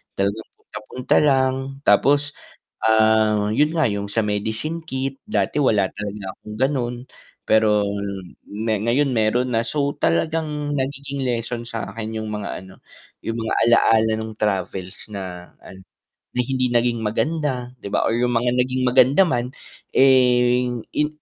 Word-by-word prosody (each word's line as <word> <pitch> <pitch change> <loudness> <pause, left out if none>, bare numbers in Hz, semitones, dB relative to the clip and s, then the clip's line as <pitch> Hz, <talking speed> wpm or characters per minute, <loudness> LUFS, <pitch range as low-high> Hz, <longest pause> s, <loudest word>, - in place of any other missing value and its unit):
talagang 100 +3 -2 0.2
papunta 115 +5 -1
lang, 130 -3 +3 0.3
tapos, 145 +8 +4 0.5
ah, 110 -1 +3
'yon 150 +7 +2
nga, 160 - +2
'yung 100 0 -3
sa 115 - +1
medicine 110 +10 -2
kit, 135 -2 -4
dati, 215 - 0
wala 105 -9 +2
talaga 105 0 -6 0.2
akong 105 - -10
gano'n, 130 -3 0 0.5
pero 105 -2 +3 0.6
me 110 +2 -2
ngayon 135 +5 +2
meron 115 +3 +1
na. 115 - +2
So, 140 +4 -1
talagang, 150 - -1
nagiging 140 0 -3
lesson 120 -1 -2
sa'kin 110 -1 -5
'yung 110 - -5
mga 105 -1 -4
ano, 95 0 -16 0.4
'yung 115 +1 -3
mga 110 -1 -2
alaala, 110 -1 +4
no'ng 110 0 -6
travels 95 -2 -2
na, 90 -3 -7
an 95 - -12 0.5
na 125 - +2
hindi 130 0 0
naging 120 -1 +1
maganda, 125 +2 -1
'di - - -5
ba, - - +1
or 115 - +1
'yung 120 +1 +1
mga 120 +1 +2
naging 130 +1 -2
maganda 130 +7 +5
man, 125 -5 -1 0.4
eh, 125 -2 +4 0.3
in 150 0 +2
120 Hz, 140 wpm, -22 LUFS, 110-135 Hz, 0.6 s, maganda